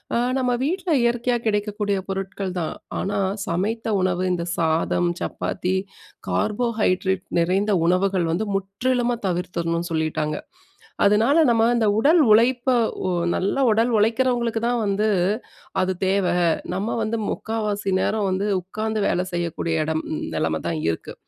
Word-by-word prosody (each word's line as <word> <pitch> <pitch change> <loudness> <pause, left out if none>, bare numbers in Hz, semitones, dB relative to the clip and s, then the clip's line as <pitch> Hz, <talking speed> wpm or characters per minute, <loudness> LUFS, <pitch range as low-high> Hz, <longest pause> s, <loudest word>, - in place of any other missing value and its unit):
அ, - - +3 0.2
நம்ம 250 -1 +1
வீட்ல 360 +5 -2
இயற்கையா 240 +1 +1
கிடைக்கக்கூடிய 205 -1 0
பொருட்கள் 195 -1 -4
தான். 160 - -3 0.3
ஆனா, 200 +1 -1 0.3
சமைத்த 215 +6 -1
உணவு, 185 -1 0
இந்த 170 -1 -2
சாதம், 165 +1 +1
சப்பாத்தி, 185 0 -2 0.5
கார்போஹைட்ரேட் 210 -4 0
நிறைந்த 190 +5 +1
உணவுகள் 185 0 +2
வந்து 210 +6 -1
முற்றிலுமா 240 +5 0
தவிர்த்திறனும்னு 170 -1 -2
சொல்லிட்டாங்க. 155 -1 -1 0.7
அதனால, 220 +9 +4
நம்ம 225 -1 +4
இந்த 225 -2 +2
உடல் 310 +9 +5
உழைப்ப, 240 +3 +4 0.4
வொ 185 - 0 0.2
நல்ல 235 +8 0
உடல் 225 +3 +2
உழைக்கிறவங்களுக்கு 230 +1 +1
தான் 240 0 +1
வந்து, 205 +2 +1 0.7
அது 185 0 +1
தேவ 195 +1 +2 0.5
நம்ம 195 +5 -2
வந்து 220 +1 -1
முக்காவாசி 210 -3 -2
நேரம் 215 +1 0
வந்து 190 +2 -1 0.2
உட்காந்து 215 +4 -3
வேலை 180 - +1
செய்யக்கூடிய 170 -2 -1
இடம் 160 0 -1 0.3
நிலைமை 80 0 0
தான் 85 -2 -1
இருக்கு, 80 - -4
200 Hz, 125 wpm, -23 LUFS, 180-225 Hz, 0.7 s, உடல்